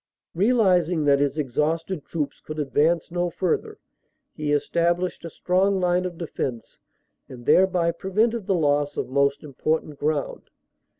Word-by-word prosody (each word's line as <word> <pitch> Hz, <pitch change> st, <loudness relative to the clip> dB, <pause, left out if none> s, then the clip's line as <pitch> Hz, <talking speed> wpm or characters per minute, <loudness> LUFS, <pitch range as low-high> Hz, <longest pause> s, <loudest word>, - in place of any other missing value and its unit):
Realising 180 Hz, -6 st, +2 dB
that 140 Hz, -1 st, +4 dB
his 140 Hz, +1 st, 0 dB
exhausted 155 Hz, +4 st, -1 dB
troops 150 Hz, -4 st, -4 dB
could 155 Hz, -, -8 dB
advance 155 Hz, +4 st, +1 dB
no 175 Hz, 0 st, 0 dB
further 175 Hz, +1 st, -2 dB, 0.6 s
he 150 Hz, -1 st, -3 dB
established 170 Hz, +5 st, 0 dB
a 165 Hz, -, -6 dB
strong 190 Hz, +4 st, +1 dB
line 180 Hz, 0 st, +1 dB
of 175 Hz, -2 st, -5 dB
defense 130 Hz, -8 st, -5 dB, 0.5 s
and 120 Hz, -2 st, -11 dB
thereby 180 Hz, -3 st, +4 dB
prevented 210 Hz, +5 st, -1 dB
the 195 Hz, -, +2 dB
loss 145 Hz, -2 st, +1 dB
of -, -, -2 dB
most 140 Hz, +2 st, +1 dB
important 150 Hz, +1 st, -2 dB
ground. 150 Hz, -1 st, -2 dB
165 Hz, 135 wpm, -24 LUFS, 145-180 Hz, 0.6 s, that